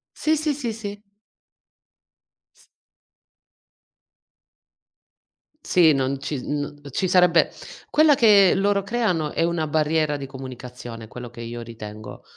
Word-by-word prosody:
Sì, 310 +1 +1
sì, 310 -1 0
sì, 245 -6 -4
sì. 205 -2 -7 1.6
S - - -25 3.0
Sì, 170 - +4
non 135 0 -1
ci 135 0 -4
no 145 0 -3 0.2
ci 185 +8 -1
sarebbe 180 -2 +4 0.4
quella 305 -1 +5
che 205 -6 +6
loro 200 +1 +2
creano 195 -9 -1
è - - 0
una 165 -2 0
barriera 155 0 +1
di 140 - -6
comunicazione, 125 -3 -9
quello 120 +2 -9
che 120 0 -11
io 120 +1 -6
ritengo. 110 -2 -9
155 Hz, 115 wpm, -23 LUFS, 130-200 Hz, 3.0 s, che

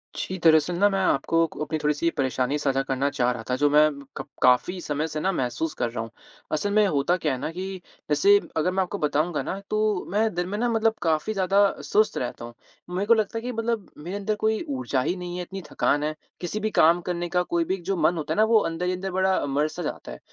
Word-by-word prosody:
जी, 185 - -4
दरअसल 160 +1 +5
ना 205 +3 +5
मैं 195 -1 0
आपको 165 +1 +2
क - - -13
अपनी 155 +1 -2
थोड़ी-सी 150 +3 +1
परेशानी 130 +1 0
साझा 135 -2 +1
करना 135 +1 0
चाह 125 -3 +1
रहा 120 -2 -5
था 125 - +2
जो 145 +3 +2
मैं 150 +1 +5 0.3
कप - - -6
काफ़ी 125 +9 +3
समय 150 0 -2
से 155 -1 -4
ना 190 +5 +1
महसूस 150 +1 -2
कर 120 - -2
रहा 115 -1 -4
हूँ। 115 - -8 0.4
असल 155 +7 0
में 210 0 +5
होता 150 +2 +1
क्या 155 -5 -1
है 130 - -4
ना 145 - -3
कि, 185 +2 -6 0.3
जैसे 150 +8 +5 0.2
अगर 165 +3 +2
मैं 190 +1 +1
आपको 185 +3 -5
बताऊँगा 150 +2 0
ना 195 - -4
तो 215 -3 0
मैं 215 +1 +1
दिन 175 0 -1
में 205 - -3
ना 240 +2 +1
मतलब 225 -1 +2
काफ़ी 160 +5 0
ज़्यादा 195 0 +2 0.2
सुस्त 215 0 +1
रहता 120 -1 -4
हूँ, 120 - -10 0.4
मेरे 185 +3 -2
को 230 - +6
लगता 220 0 0
है - - -3
कि 250 +2 -4
मतलब 230 -3 -2
मेरे 175 +6 -6
अंदर 210 +1 -1
कोई 220 +1 0 0.2
ऊर्जा 140 - -1
ही 175 - -1
नहीं 180 -1 -6
है, - - -3
इतनी 195 +2 -7
थकान 145 +1 +1
है, 155 +1 -2 0.3
किसी 180 +4 -3
भी 215 +1 -1
काम 170 +2 +5
करने 175 0 -3
का 180 0 +2
कोई 170 -1 0
भी 185 - -1
एक 185 - -12
जो 195 +2 -1
मन 160 +2 +3
होता 155 - -2
है - - -5
ना 215 - +5
वो 220 0 +5
अंदर 165 +2 -3
ही 180 - 0
अंदर 190 +1 -4
बड़ा 190 -3 +1
मर-सा 150 +5 -1
जाता 150 - -5
है, - - -9
175 Hz, 255 wpm, -25 LUFS, 150-195 Hz, 0.4 s, को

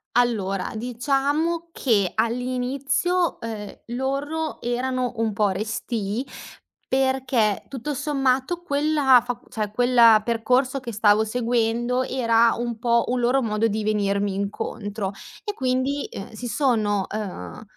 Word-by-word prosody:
Allora, 205 -6 +1
diciamo 280 +8 0
che 210 - +1
all'inizio, 255 +8 0
uhm, 220 -3 -6 0.2
loro 290 +5 -2
erano 250 +1 -1
un 225 -2 -1
po' 205 0 +2
restii 215 +2 -2 0.6
perché 260 -5 +1
tutto 275 +2 -4
sommato 270 +4 0
quella 285 -5 +3
fac 245 -1 -4
cioè, 215 -4 -3
quel 235 -1 +6
percorso 250 +4 +1
che 240 -2 -6
stavo 210 0 +4
seguendo 240 +2 0
era 230 -3 +3
un 235 -1 -3
po' 235 0 +2
un 250 0 0
loro 250 +3 +3
modo 215 -2 0
di 215 0 -2
venirmi 200 -1 0
incontro 200 0 -3 0.3
e 415 - -3
quindi, 260 +1 0
ehm, 195 - -7
si 245 +3 -7
sono, 215 -6 +1
uhm, 185 - -6
240 Hz, 120 wpm, -24 LUFS, 215-265 Hz, 0.6 s, quel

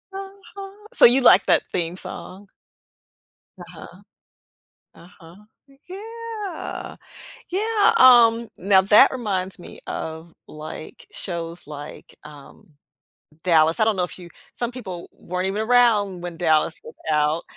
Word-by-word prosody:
Uh-huh. 390 0 -10 0.2
So, - - +6
you 250 +3 +5
like 200 - +5
that - - +3
theme 175 0 -3
song? 190 +1 -8 1.1
Uh-huh. - - -13 0.9
Uh-huh. 170 -1 -17 0.5
Yeah. 430 -1 -7 0.5
Yeah, 425 +3 +2
um, 235 -2 +6
now 190 0 +4
that 205 +2 +6
reminds 195 -8 -3
me - - -12
of, 160 +1 -7
like, 155 +1 -10
shows 170 -3 -4
like, 145 -1 -10
um, 150 +7 -15 0.8
Dallas, 160 -2 +3
I - - +5
don’t 220 -3 +1
know 180 - 0
if 180 - -8
you 175 -1 -12 0.2
some 240 0 -3
people 190 -9 -8
weren’t 180 +1 -5
even 200 +2 -3
around 220 -6 +2
when 175 -1 -7
Dallas 160 -1 +1
was 155 - -13
out. 150 +2 +1
190 Hz, 125 wpm, -22 LUFS, 170-245 Hz, 1.1 s, So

